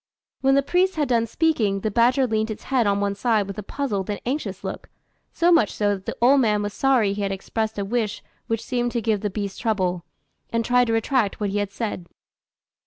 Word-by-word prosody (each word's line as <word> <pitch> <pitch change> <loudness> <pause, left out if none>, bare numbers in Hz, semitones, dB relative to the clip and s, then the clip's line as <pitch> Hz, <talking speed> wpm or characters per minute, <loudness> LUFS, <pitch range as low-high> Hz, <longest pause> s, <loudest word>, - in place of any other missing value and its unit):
When 270 0 +3
the 275 - +3
priest 365 +6 +1
had 295 -4 0
done 230 -2 +2
speaking, 225 -9 +1
the 215 - -1
badger 245 +5 +3
leant 220 -2 0
its 215 - -6
head 245 -5 +3
on 200 0 +2
one 200 0 0
side 215 0 +1
with 195 +1 -7
a - - -2
puzzled 205 -4 -3
and 205 - -2
anxious 275 +5 -3
look, - - -6 0.4
so 345 +1 +2
much 235 - +4
so 205 -1 +1
that 190 -1 -8
the - - -4
old 265 +3 +5
man 210 -3 +2
was 205 0 -3
sorry 250 -7 +2
he 205 - -4
had 200 -1 -1
expressed 220 +3 -3
a 200 - -2
wish 220 0 -2 0.2
which 225 -1 -2
seemed 240 -1 -1
to 235 - 0
give 215 -2 +1
the 210 - -1
beast 200 0 -5
trouble, 185 -6 0 0.5
and 230 0 -1
tried 245 0 +3
to 225 - 0
retract 225 -2 +1
what 205 -2 -1
he 205 - 0
had 205 -1 -1
said. 200 -5 -4
220 Hz, 230 wpm, -23 LUFS, 200-250 Hz, 0.5 s, old